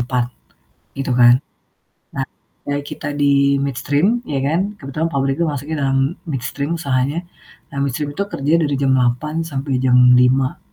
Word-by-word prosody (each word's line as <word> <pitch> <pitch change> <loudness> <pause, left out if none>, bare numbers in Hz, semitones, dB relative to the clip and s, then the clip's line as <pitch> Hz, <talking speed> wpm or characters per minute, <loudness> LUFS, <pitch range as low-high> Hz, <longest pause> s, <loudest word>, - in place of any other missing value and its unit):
4.00 125 0 0 0.7
gitu 135 -1 -2
kan. 120 0 +7 0.8
Nah - - -1 0.4
kayak 145 0 -1
kita - - -6
di 140 -1 +3
midstream 145 - +1
ya 140 -2 -1
kan, 160 +4 +1 0.2
kebetulan 145 +4 -2
pabrikku 135 +3 0
masuknya 145 +1 -3
dalam 135 0 +2 0.3
midstream 140 +4 -3
usahanya. 140 +3 -1 0.5
Nah, - - -7
midstream 140 +2 -2
itu 200 - 0
kerja 145 -5 -1
dari 145 -3 0
jam 135 -1 +2
8.00 130 +6 0
sampai 135 -3 -2
jam 125 -1 +4 0.2
5.00 130 +1 +2
140 Hz, 145 wpm, -19 LUFS, 130-145 Hz, 0.8 s, kan